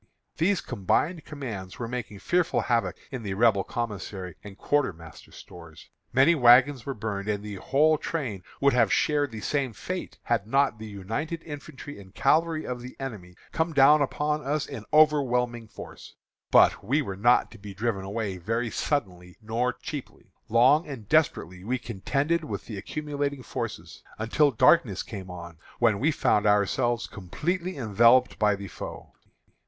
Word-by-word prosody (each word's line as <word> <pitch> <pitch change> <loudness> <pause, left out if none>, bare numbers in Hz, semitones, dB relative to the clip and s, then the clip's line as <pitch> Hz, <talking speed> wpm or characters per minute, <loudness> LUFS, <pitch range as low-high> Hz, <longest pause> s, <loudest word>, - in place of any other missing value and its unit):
These 185 +3 +2
combined 155 - -1
commands 115 -11 -7
were 115 - -4
making 115 -4 -5
fearful 175 - +1
havoc 120 -2 0
in 130 -3 -5
the 100 -3 -4
Rebel 105 -2 +3
commissary 105 -6 -5
and 100 -1 -11
quartermaster 85 - -2
stores. 85 -3 -13 0.2
Many 135 +6 +5
wagons 130 -1 +5
were 135 - -3
burned, 105 -2 -4
and 105 -1 -1
the 105 -2 -6
whole 155 +8 +2
train 125 - -3 0.2
would 140 0 +3
have 115 -5 +3
shared 145 -1 +2
the 110 -3 -8
same 135 0 -1
fate - - -6
had 100 - 0
not 135 -2 +2
the 110 - -7
united 115 - -4
infantry 145 -3 -9
and 95 -1 -17
cavalry 155 +3 +2
of 125 -1 -4
the 125 +1 -9
enemy 105 -10 -7 0.2
come 160 0 -1
down 145 +1 +6
upon 150 +2 -1
us 145 +2 -1
in 120 -7 -8
overwhelming 125 -6 +3
force. - - -11 0.3
But - - +5
we 140 +9 +1
were 95 -6 -5
not 120 +6 +3
to - - -13
be 100 -1 -9
driven 105 -2 -2
away 100 -1 -3
very 115 +6 -2
suddenly 90 - -3
nor 115 +3 -1
cheaply. 145 +1 -9 0.2
Long 130 +8 +4
and 125 -8 -8
desperately 95 - +1
we 125 +5 -1
contended 140 - -1
with 155 - -5
the 105 -4 -6
accumulating 145 +2 -4
forces, - - -6 0.2
until 115 +7 +2
darkness 125 - +3
came 95 -2 -8
on, 85 -2 -9 0.2
when 110 -4 +2
we 150 - +2
found 105 -8 +2
ourselves 115 +4 +2
completely 170 - -4
enveloped 120 +2 +4
by 105 -1 +3
the 100 0 -8
foe. - - -9
120 Hz, 160 wpm, -26 LUFS, 100-145 Hz, 0.3 s, down